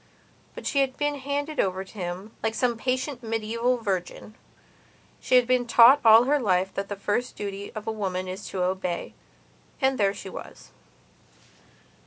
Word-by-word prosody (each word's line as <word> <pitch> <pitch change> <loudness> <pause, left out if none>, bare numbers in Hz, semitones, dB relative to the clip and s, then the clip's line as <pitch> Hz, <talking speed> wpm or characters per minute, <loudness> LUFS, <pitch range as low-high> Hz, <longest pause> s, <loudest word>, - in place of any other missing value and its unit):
But - - -9
she 280 - +2
had 265 -1 -1
been 290 -1 -1
handed 285 +2 -3
over 190 0 0
to 190 - -17
him, 185 +1 -6
like 225 0 -1
some 240 +1 +1
patient 255 +3 -2
medieval 230 +2 -1
virgin; 195 -1 -4 0.9
she - - +1
had 250 -1 +6
been 250 -1 +1
taught 240 +4 +7
all 225 0 +8
her 290 +3 +2
life 190 -5 +1
that 195 0 -4
the 205 - -3
first 205 +5 -2
duty 200 0 -6
of 215 - -6
a 225 - -1
woman 185 -4 -3
is 190 +2 -6
to 185 -2 -2
obey. 180 -1 -2 0.7
And 265 -2 +1
there 200 -1 +2
she - - -9
was. 190 - -10
220 Hz, 170 wpm, -26 LUFS, 195-255 Hz, 0.9 s, all